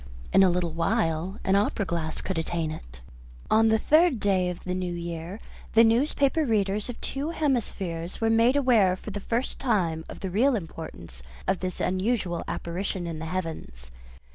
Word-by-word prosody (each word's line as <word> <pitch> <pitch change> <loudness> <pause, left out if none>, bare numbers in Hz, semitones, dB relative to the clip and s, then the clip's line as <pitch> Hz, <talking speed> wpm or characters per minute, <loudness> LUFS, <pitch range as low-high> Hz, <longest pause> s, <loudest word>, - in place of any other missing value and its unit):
In - - +7
a 190 - +6
little 175 -1 0
while 165 +2 0
an 190 - +2
opera 200 0 +1
glass 165 -3 -2
could 190 -4 -2
attain 165 -1 -2
it. - - -10 0.5
On 225 +1 +5
the 220 0 +4
third 310 +2 +4
day 190 -3 +2
of 180 - -6
the 180 - -2
new 180 -1 -2
year 170 +3 -5 0.4
the 225 - +8
newspaper 275 +6 +3
readers 210 -3 0
of 245 - -6
two 280 +3 -3
hemispheres 200 - -2
were 225 0 +2
made 230 +4 +4
aware 235 -10 +4
for 210 - -8
the 205 - -4
first 230 +5 -2
time 180 -10 0
of - - -9
the 190 - -3
real 245 +7 +3
importance 160 - -7 0.3
of 190 - +1
this 185 -1 -4
unusual 185 -2 0
apparition 180 +1 -3
in 165 -2 -5
the 160 - -5
heavens. 160 - -5
190 Hz, 175 wpm, -27 LUFS, 170-225 Hz, 0.5 s, the